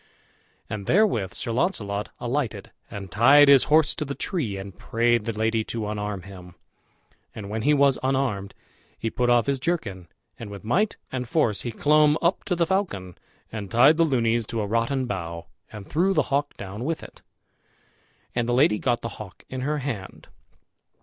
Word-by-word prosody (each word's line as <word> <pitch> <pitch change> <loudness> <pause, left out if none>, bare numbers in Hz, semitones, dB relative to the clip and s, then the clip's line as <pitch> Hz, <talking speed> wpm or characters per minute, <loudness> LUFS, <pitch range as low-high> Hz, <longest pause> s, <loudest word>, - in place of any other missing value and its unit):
And 105 -3 -6
therewith 175 - +2
Sir 120 - -4
Launcelot 105 - -1
alighted 125 -1 -3 0.2
and 100 -3 -8
tied 140 +6 +6
his 140 -2 +7
horse 155 -1 +4
to 155 - -3
the 140 -1 -5
tree, 125 - -2
and 95 -1 -8
prayed 120 -1 +1
the 115 - -1
lady 110 +1 0
to 115 -2 -4
unarm 105 -2 -4
him. 90 -2 -12 0.8
And 105 -2 -7
when 110 +1 -2
he 150 +6 +3
was 140 -2 +3
unarmed, 130 -7 -1 0.4
he 115 - -3
put 125 -1 0
off 120 -2 +4
his 140 -1 0
jerkin, 105 - -3 0.3
and 115 - -7
with 100 -1 -9
might 195 - +1
and 125 -2 -4
force 115 -10 +1
he 120 - -4
clomb 150 +4 +4
up 170 +2 +1
to 180 - 0
the 170 0 +2
falcon, 160 - -2 0.4
and 105 -3 -6
tied 135 +7 +5
the 165 - +5
lunys 120 -6 +1
to 115 - -2
a - - -1
rotten 115 +5 0
bough, 85 -6 -5 0.3
and 105 -3 -9
threw 185 +5 +1
the 155 - 0
hawk 145 +1 0
down 100 +4 -7
with 160 +4 -2
it; - - -13 1.1
and 120 -1 -1
the - - +2
lady 130 -5 +4
got 120 -2 0
the 115 - -3
hawk 100 -4 -10
in 130 0 -5
her 150 +3 -1
hand. 125 -9 -6
120 Hz, 185 wpm, -25 LUFS, 105-145 Hz, 1.1 s, his